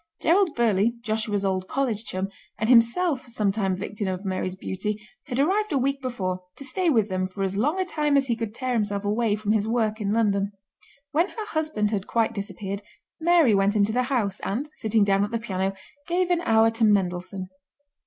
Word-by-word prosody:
Gerald 350 0 +3
Burleigh, 225 -1 +2
Joshua's 215 -2 -1
old 185 -1 -1
college 235 -5 -1
chum, 190 0 -3 0.3
and 220 - -1
himself 255 +4 +4
a - - -13
sometime 200 -4 0
victim 205 +1 -4
of 185 +1 -3
Mary's 185 -1 -2
beauty, 200 +3 -3 0.3
had 255 -2 -2
arrived 395 +8 +2
a 285 - +2
week 275 +1 0
before, 185 -8 -3
to 275 - -8
stay 345 +7 0
with 225 -8 +3
them 185 -1 -1
for 195 +1 -4
as 190 0 -1
long 295 - +1
a 375 - +1
time 300 -4 +1
as 275 - +3
he 240 -3 0
could 225 -1 -5
tear 255 0 -2
himself 205 -3 -1
away 210 +1 +1
from 210 0 -2
his 215 -1 +1
work 220 -2 0
in 200 -1 0
London. 205 -2 +1 0.6
When 335 +7 +2
her 435 -2 -6
husband 310 - 0
had 200 -3 -2
quite 230 -1 +1
disappeared 200 0 -5 0.4
Mary 325 -7 +5
went 200 +1 +3
into 205 0 +3
the 245 +3 +2
house, 215 -8 0
and, 270 +10 -3
sitting 220 -1 +2
down 200 0 +3
at 205 - -1
the 230 - -1
piano, 195 -4 -2 0.3
gave 360 +1 +1
an 345 -1 +2
hour 225 -7 +4
to 225 0 -2
Mendelssohn. 185 -2 +1
220 Hz, 205 wpm, -25 LUFS, 200-260 Hz, 0.6 s, Mary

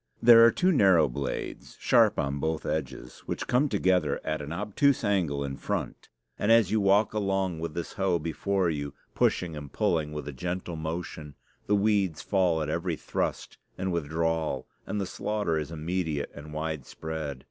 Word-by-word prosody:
There 115 -1 +8
are 115 - +8
two 185 +8 +2
narrow 95 - +5
blades, 70 +2 -5
sharp - - +4
on 70 +1 -1
both 80 +1 -2
edges, 70 -5 -4
which - - -3
come 135 +4 +2
together 90 - +1
at 80 -1 -2
an 75 +1 -6
obtuse 105 +10 +1
angle 85 -9 +1
in 70 -1 -4
front; - - -4 0.3
and 105 - +2
as 115 -5 +5
you 110 -1 +2
walk 100 +2 +3
along 95 -5 0
with 80 -1 -5
this 85 - -4
hoe 95 -3 +1
before 90 +4 -1
you, 70 -3 -3 0.2
pushing 85 -3 +1
and 75 -2 -8
pulling 80 -3 0
with 75 -2 -6
a 75 - -5
gentle 85 +4 -4
motion, 80 -2 -5 0.3
the 105 - +3
weeds 100 -5 +1
fall 90 -5 +2
at - - -4
every 85 0 -1
thrust - - -3 0.2
and 95 0 -2
withdrawal, 80 -3 -1 0.2
and 105 - -2
the 100 - -1
slaughter 100 -4 -1
is 75 - -4
immediate 80 -1 -2
and 75 +1 -10
widespread. 80 -1 -5
85 Hz, 170 wpm, -28 LUFS, 75-95 Hz, 0.3 s, There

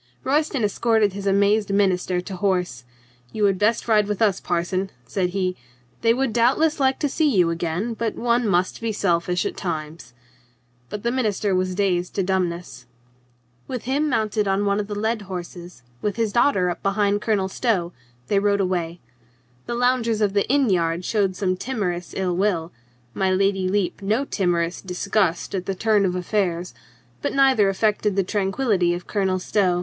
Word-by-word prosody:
Royston 285 -2 +1
escorted 215 -1 +2
his 200 0 -5
amazed 200 +1 +2
minister 185 -2 +1
to 190 +1 -7
horse. 180 - -1 0.5
"You 215 -1 0
had 195 -2 +2
best 215 +3 +1
ride 210 -2 +3
with 210 -2 -2
us, 205 -5 +2
parson," 180 +2 -1 0.2
said 180 +8 -1
he. 185 -1 -1 0.5
"They 230 - +4
would 255 -1 0
doubtless 270 +7 +2
like 265 -1 +2
to 295 - +2
see 300 +2 +1
you 180 -9 +3
again, 170 +7 -2
but 225 0 -3
one 235 0 +1
must 185 +1 0
be 230 -1 -1
selfish 180 -2 0
at - - -3
times." 155 -6 -5 0.7
But 210 - -6
the 235 - +1
minister 215 -5 0
was 185 0 0
dazed 180 -3 0
to 195 - +1
dumbness. 175 -8 -2 0.8
With 250 -3 -5
him 285 +5 0
mounted 215 -4 0
on 195 +1 +1
one 200 0 +1
of 205 - -3
the 205 - -5
led 220 +1 -1
horses, 175 -5 -8 0.2
with 205 - -1
his 225 -3 -1
daughter 215 -8 +3
up - - -7
behind 200 +1 +1
Colonel 205 -4 +1
Stow, 190 -5 -1 0.3
they 200 - +2
rode 200 0 +2
away. 175 -3 -2 0.7
The 240 - -2
loungers 240 -2 +1
of 205 -2 +1
the 200 -1 +1
inn 270 -4 +3
yard 170 -1 0
showed 200 -4 0
some 185 -1 0
timorous 180 - -3
ill 185 -2 0
will, 180 -3 0 0.4
my 190 -1 0
Lady 195 0 +1
Lepe 200 0 -1
no 220 +8 0
timorous 175 -6 -1
disgust 185 -1 -1
at 185 -2 -3
the 195 - -1
turn 210 0 +2
of 180 -1 0
affairs, 180 -2 -1 0.5
but - - -2
neither 265 -7 +4
affected 210 0 +1
the 195 - +2
tran 195 0 -1
quillity 195 -8 +1
of 175 - -8
Colonel 190 -3 0
Stow. 185 -1 +1
195 Hz, 175 wpm, -23 LUFS, 180-220 Hz, 0.8 s, They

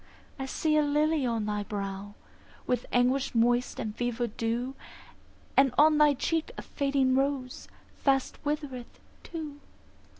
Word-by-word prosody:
I 270 - -3
see 305 +3 +1
a - - +5
lily 300 -1 +2
on 230 -3 -1
thy 210 0 -1
brow, 200 -1 -5 0.5
With 250 -1 -1
anguish 250 +2 +2
moist 240 +2 +2
and 215 -1 -4
fever 245 0 -1
dew; 235 +3 -2 0.8
And 270 -3 +4
on 305 +1 +6
thy 295 -1 +6
cheek 325 +4 -1
a - - -6
fading 275 -2 +1
rose 270 -2 -1 0.3
Fast 270 -2 +1
withereth 290 -5 -4 0.2
too. 305 -4 -7
260 Hz, 135 wpm, -29 LUFS, 235-290 Hz, 0.8 s, on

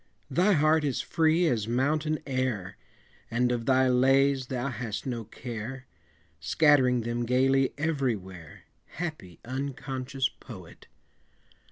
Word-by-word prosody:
Thy 180 +9 +3
heart 155 -1 +3
is 140 -4 -1
free 165 +1 +2
as 115 -9 0
mountain 150 +6 0
air, 130 -9 -2 0.5
And 125 +1 +1
of 120 -2 -2
thy 130 0 +4
lays 135 +1 +3
thou 130 +1 -2
hast 115 -4 -5
no 120 -4 -4
care, 120 +3 -7 0.5
Scattering 125 - +3
them 120 +1 -2
gayly 130 +2 +2
everywhere, 110 - -3 0.3
Happy, 155 - -6
unconscious 135 0 -3
poet! 95 -11 -13
130 Hz, 115 wpm, -28 LUFS, 120-140 Hz, 0.5 s, thy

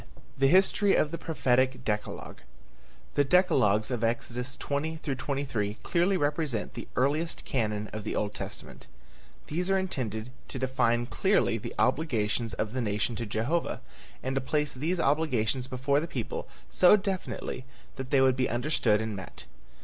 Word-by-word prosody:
I. - - -19 0.2
THE 135 - +5
HISTORY 195 +4 +5
OF 150 - +2
THE 170 - -4
PROPHETIC 130 -4 +1
DECALOGUE. 105 -1 -3 0.7
The 145 - +4
decalogues 135 - +3
of 120 -2 -1
Exodus 120 +3 -1
20 155 +3 -2
23 135 -7 -2
clearly 180 +3 +2
represent 145 - -1
the 120 - -7
earliest 150 +6 0
canon 105 -4 -1
of 110 -1 -4
the 110 - -3
Old 105 -1 -1
Testament. 65 - -7 0.6
These 180 +5 -2
are 195 - +4
intended 125 - -3 0.2
to - - -6
define 120 -2 +1
clearly 120 - +2
the - - -7
obligations 115 -6 +1
of 110 +1 -2
the 130 - -1
nation 105 +1 -1
to 115 -1 -3
Jehovah, 120 +11 -1 0.4
and 130 - -1
to 135 - 0
place 150 +2 0
these 160 +7 -1
obligations 130 -5 +1
before 130 +2 +1
the 165 - -3
people 125 -8 -4 0.2
so 185 +3 +6
definitely 190 - -4 0.3
that 130 -1 -5
they 140 -2 +4
would 130 -1 +5
be 130 -1 +1
understood 120 -3 +1
and 110 -2 -3
met. 95 - -9
130 Hz, 155 wpm, -29 LUFS, 115-155 Hz, 0.7 s, so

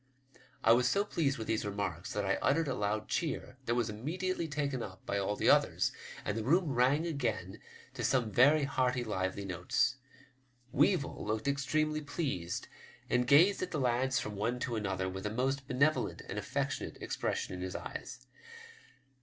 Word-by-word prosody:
I 115 - +6
was 120 +1 +5
so 200 +1 +2
pleased 145 -9 0
with 110 - -4
these 110 0 0
remarks 100 -4 -3
that 105 -1 -1
I 95 - +1
uttered 155 +3 +2
a 135 - 0
loud 105 -1 -1
cheer, 150 -6 -2
that 115 - +2
was 120 -2 +1
immediately 165 - -2
taken 145 -4 -2
up 95 -4 -8
by 100 - -1
all 100 +1 0
the - - 0
others, - - +3 0.3
and 100 - -1
the 110 - -2
room 165 - +3
rang 130 +6 +3
again 120 - -2 0.3
to - - -5
some 120 -5 +2
very 145 +7 +5
hearty, 130 -2 +1
lively 100 -2 -2
notes. 90 +7 0 0.7
Weevil - - +2
looked 110 +4 -2
extremely 155 +2 +1
pleased, 135 - -3 0.4
and 125 0 +2
gazed 170 +9 +6
at 185 - -2
the 155 - -2
lads 130 +1 +2
from 105 -1 -5
one 115 +5 -1
to 120 - -1
another 95 -3 -1
with 95 +2 -4
a - - -1
'most 135 +4 -1
benevolent 140 +5 +1
and 105 - -3
affectionate 135 +7 -3
expression - - -2
in 90 - -5
his 90 0 -4
eyes. - - -7
125 Hz, 175 wpm, -32 LUFS, 105-140 Hz, 0.7 s, I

